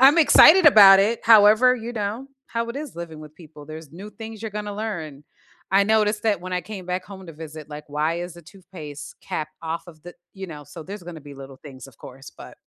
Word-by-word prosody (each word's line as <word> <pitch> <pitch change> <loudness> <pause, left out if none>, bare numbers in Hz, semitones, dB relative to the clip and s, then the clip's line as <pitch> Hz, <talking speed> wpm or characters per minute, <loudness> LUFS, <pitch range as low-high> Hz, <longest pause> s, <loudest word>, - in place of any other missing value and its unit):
I'm 275 +4 +6
excited 330 +3 +7
about 200 -8 +8
it, 220 +4 0
however, 220 +3 +6
you 235 0 -7
know, 220 +5 -5 0.2
how 230 0 -4
it 235 - -6
is 290 -2 -7
living 170 -2 -8
with 150 0 -13
people 155 -3 -15
there's 155 -1 -11
new 195 +5 -10
things 220 +1 -10
you're 220 -1 -6
gonna 210 0 -6
learn. 160 -10 -6 0.5
I 195 +1 +5
noticed 210 0 +1
that 215 -5 0
when 185 +1 -8
I 180 - -1
came 190 0 -10
back 180 0 -4
home 190 -1 -12
to 165 - -10
visit, 155 -1 -11
like, 150 0 -9
why 155 +4 -2
is 175 -1 -7
the 170 - -14
toothpaste 155 -5 -12
cap 155 - -5
off 165 +2 -5
of 155 -3 -16
the 175 - -12 0.2
you 190 -1 -8
know, 150 -4 -10
so 165 +4 -11
there's 200 +2 -9
gonna 170 -2 -10
be 145 0 -13
little 135 -1 -12
things, 130 -3 -13
of 125 - -20
course, 135 +2 -13
but - - -13
185 Hz, 230 wpm, -22 LUFS, 155-215 Hz, 0.5 s, about